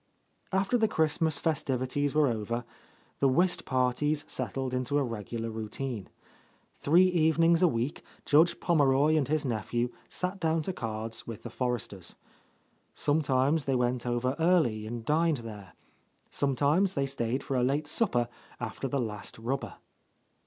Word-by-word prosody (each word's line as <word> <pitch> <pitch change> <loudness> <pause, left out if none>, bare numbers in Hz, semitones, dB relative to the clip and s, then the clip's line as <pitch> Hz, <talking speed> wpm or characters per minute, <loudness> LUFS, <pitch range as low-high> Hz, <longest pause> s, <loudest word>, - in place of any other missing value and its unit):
After 195 +5 +1
the 220 - +4
Christmas, 160 -4 +2
festivities 145 -2 -1
over, 120 -5 +1 0.6
the 140 - +4
whist 175 +7 +2
parties 135 +4 +1
settled 130 -1 -3
into 130 +3 0
a 145 - +2
regular 115 -1 -4
routine. 110 0 -5 0.7
Three 170 +6 +5
evenings 165 -1 +3
a 180 - +6
week 125 -1 -2 0.2
Judge 160 +4 +4
Pommeroy 145 -1 +3
and 145 -5 +2
his 155 0 0
nephew 120 +1 -1 0.2
sat 185 +2 -3
down 160 -1 +1
to 190 - -3
cards 110 -4 -4
with 115 -3 -7
the 120 - -7
Forresters. 120 -8 -4 0.8
Sometimes 145 0 +1
they 135 - +1
went 125 0 0
over 120 +2 0
early 155 -11 +2
and 115 0 -6
dined 160 +1 +2
there. 105 -5 -9 0.6
Sometimes 145 +7 +2
they 140 - +1
stayed 130 -1 -2
for 135 - -3
a 125 - +2
late 140 +4 +1
supper 145 - +1 0.3
after 125 +3 -4
the 140 - -1
last 105 -4 -4
rubber. 125 +5 -3
135 Hz, 140 wpm, -29 LUFS, 120-155 Hz, 0.8 s, a